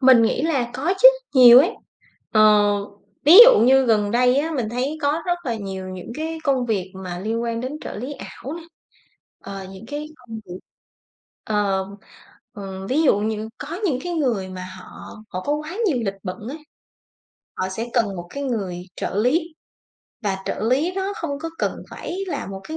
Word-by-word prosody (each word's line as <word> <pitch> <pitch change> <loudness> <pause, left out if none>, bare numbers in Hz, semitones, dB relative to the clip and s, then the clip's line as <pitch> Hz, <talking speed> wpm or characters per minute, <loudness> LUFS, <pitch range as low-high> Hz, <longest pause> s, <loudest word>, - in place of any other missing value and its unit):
Mình 255 -3 +7
nghĩ 225 - +1
là 270 -7 0
có 320 +9 0
chứ, - - +12 0.3
nhiều 245 -1 +10
ấy. 335 +8 +4 0.6
Ờ, 215 - +4 0.8
ví 330 +7 +9
dụ - - +7
như 265 +2 +5
gần 210 -2 +2
đây 250 +2 +3
á 310 +3 0
mình 230 -4 -1
thấy 265 +6 -2
có 295 +3 +1
rất 350 0 0
là 235 -3 -1
nhiều 190 -2 -6
những 185 +4 -8
cái 320 +2 -4
công 265 -3 +1
việc 195 -4 -2
mà 175 -1 -5
liên 225 +4 -2
quan 230 -1 -2
đến 270 +5 -5
trợ - - -7
lý 255 +7 -5
ảo 275 0 -8
nè, 340 - -8 0.8
ờ, 195 -1 -8
những 195 +4 -11
cái 295 +2 -5
công 235 -3 -11
việc 180 0 -9 0.8
ờ, 200 -3 0 0.7
ờ, 195 -2 -7
ví 290 +5 +1
dụ 205 -8 +4
như 215 +1 -3
có 315 +4 -6
những 265 -8 0
cái 355 - -3
người 240 - -1
mà 185 0 -7
họ - - -12
họ 185 - -5
có 290 - -1
quá 310 +6 -6
nhiều 280 -8 +1
lịch 195 0 -2
bận 185 -1 -5
ấy, 300 - -6 1.0
họ 185 0 -2
sẽ 225 +5 -4
cần 215 -6 +1
một 175 0 -7
cái 280 0 -4
người 195 -9 -3
trợ - - -4
lý 310 - +1 0.7
và 195 -2 -1
trợ - - -3
lý 305 +8 +1
nó 390 +1 -2
không 285 -4 -4
có 330 - -5
cần - - -1 0.2
phải 355 - -6
là 365 - -4
một 195 0 -7
cái 315 - -4
245 Hz, 195 wpm, -22 LUFS, 200-295 Hz, 1.0 s, chứ